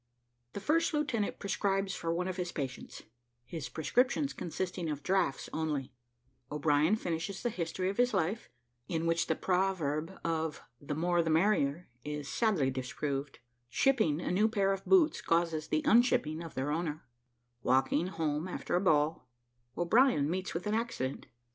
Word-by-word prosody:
THE - - -4
FIRST 320 +9 +1
LIEUTENANT 250 -9 -1
PRESCRIBES 195 0 0
FOR 165 -1 -2
ONE 180 +2 -1
OF 185 0 -3
HIS 180 -1 -2
PATIENTS, 135 -5 -5 0.4
HIS 155 -7 -6
PRESCRIPTIONS 250 - +1
CONSISTING 175 0 -3
OF 145 -1 -4
"DRAUGHTS" 185 -7 +1
ONLY 150 -5 -2 0.6
O'BRIEN 150 +4 +3
FINISHES 180 0 -3
THE 240 - 0
HISTORY 185 0 -2
OF 200 - -9
HIS 245 0 +3
LIFE, 195 +3 -1 0.4
IN 165 -1 -1
WHICH 165 0 +1
THE 160 - +1
PROVERB 180 -3 0
OF 160 -2 -2 0.2
"THE 145 0 -4
MORE 175 +2 +2
THE 165 - -1
MERRIER" 165 -2 +2 0.2
IS 150 -1 -5
SADLY 180 - +1
DISPROVED 135 +2 -3 0.3
"SHIPPING" 220 - +2
A - - -2
NEW 205 +4 +4
PAIR 200 -3 +2
OF 195 0 -6
BOOTS 345 -5 +4
CAUSES 165 -2 +1
THE 155 0 0
"UNSHIPPING" 190 - +3
OF 165 -2 -8
THEIR 135 +3 -1
OWNER 155 -1 -2 0.6
WALKING 135 +7 +2
HOME 160 -2 -2
AFTER 180 - -3
A - - +1
BALL; 155 -5 +2 0.5
O'BRIEN 195 - +4
MEETS 185 0 -3
WITH 170 - -3
AN 210 - 0
ACCIDENT. 220 - -2
170 Hz, 155 wpm, -32 LUFS, 150-195 Hz, 0.6 s, NEW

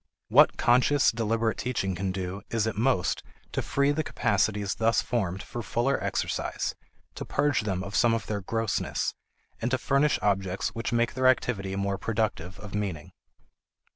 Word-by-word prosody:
What - - +6
conscious, 130 +4 +4
deliberate 115 0 0
teaching 110 -6 -1
can 95 +1 -2
do 95 +1 -4
is 115 -2 0
at 110 - -2
most 110 -4 +1 0.3
to - - -1
free 140 +1 +1
the 155 +2 0
capacities 105 -4 0
thus 115 0 +2
formed 95 -6 -1
for 120 - -6
fuller 120 +6 0
exercise, - - -2 0.4
to - - -6
purge 145 -4 +1
them 95 -3 -2
of 100 +1 -6
some 115 0 +4
of 110 - -3
their 105 -2 -3
grossness, 115 +2 -1 0.5
and 115 - 0
to 130 - +1
furnish 140 +3 +2
objects 95 -2 0
which 115 +1 -4
make 120 0 +1
their 130 0 +2
activity 100 -7 +1
more 100 0 -1
productive 100 -5 -2
of 105 - -9
meaning. 95 -8 -3
110 Hz, 165 wpm, -27 LUFS, 95-120 Hz, 0.5 s, What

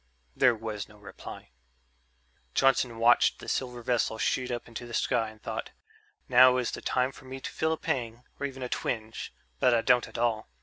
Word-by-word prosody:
There 125 - +5
was 110 -2 -5
no 105 - -16
reply. 100 -9 -10 1.0
Johnson 130 -3 +3
watched 120 +1 +5
the - - -11
silver 125 -2 -2
vessel 120 -2 +1
shoot 125 +3 0
up 120 -1 -4
into 120 +1 -7
the 120 - -5
sky 115 -2 +1
and 110 0 -15
thought, - - -5 0.6
"Now 125 0 +7
is 125 -2 0
the - - -6
time 130 +1 +1
for 130 - -15
me 130 +1 -7
to - - -6
feel 160 0 0
a - - -3
pang, 120 -4 -3 0.2
or 140 - -1
even 135 -1 -8
a - - -2
twinge, 110 -2 -3 0.3
but 125 -2 +4
I 115 - +3
don't 125 -1 +4
at - - -9
all. 115 - 0
120 Hz, 200 wpm, -29 LUFS, 115-130 Hz, 1.0 s, Now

